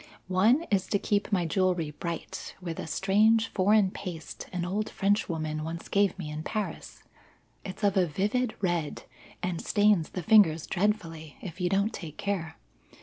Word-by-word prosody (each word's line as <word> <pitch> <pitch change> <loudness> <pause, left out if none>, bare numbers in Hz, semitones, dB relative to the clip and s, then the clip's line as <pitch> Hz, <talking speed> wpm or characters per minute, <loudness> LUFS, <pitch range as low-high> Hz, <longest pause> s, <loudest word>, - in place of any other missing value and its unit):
One 225 - +4
is 190 -2 +2
to 200 - +2
keep 205 +1 -1
my 180 -4 +2
jewelry 175 -2 +1
bright 170 +2 -6
with 170 -3 -5
a - - -5
strange 215 +6 +3
foreign 200 0 +3
paste 170 -5 -7
an 175 -1 -2
old 205 +4 -2
Frenchwoman 165 -7 0
once 165 +1 -5
gave 200 -2 +2
me 155 -5 -5
in 150 +1 -4
Paris. 210 +5 -5 0.6
It's 190 +2 -8
of 200 -1 +3
a 185 -2 +3
vivid 210 +9 0
red, 175 -5 -1 0.4
and 180 -2 -2
stains 205 -6 +3
the 180 - -5
fingers 170 -7 +5
dreadfully 165 -6 -2
if 180 -1 -8
you 180 - +1
don't 200 +3 +1
take 160 -5 -8
care. 180 -6 -3
185 Hz, 160 wpm, -28 LUFS, 165-205 Hz, 0.6 s, fingers